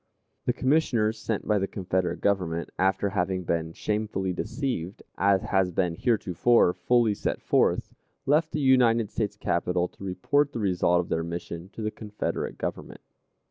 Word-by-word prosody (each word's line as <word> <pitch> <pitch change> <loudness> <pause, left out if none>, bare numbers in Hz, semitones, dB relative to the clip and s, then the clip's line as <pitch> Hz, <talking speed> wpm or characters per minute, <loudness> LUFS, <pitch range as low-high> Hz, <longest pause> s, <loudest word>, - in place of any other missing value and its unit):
The 125 - +3
Commissioners 125 -6 +1
sent 110 -2 -3
by 105 -1 +3
the 95 - -1
Confederate 95 -2 -2
Government, 90 -5 0
after 95 +1 +2
having 95 -1 -1
been 80 -1 -1
shamefully 105 -1 -2
deceived, 100 - -3
as 100 -1 +3
has 95 -2 +1
been 90 -1 0
heretofore 110 0 +2
fully 120 -1 +2
set - - -2
forth, - - +1 0.3
left 155 +3 +2
the 150 - -2
United 120 -5 +4
States 105 -2 -2
capital 90 -1 0
to - - -14
report 140 +10 +1
the - - -3
result 90 -3 +2
of 85 - -9
their 80 - 0
mission 85 +1 -6
to 110 - -6
the 110 - -1
Confederate 105 -1 -4
Government. - - -5
100 Hz, 155 wpm, -27 LUFS, 90-115 Hz, 0.3 s, United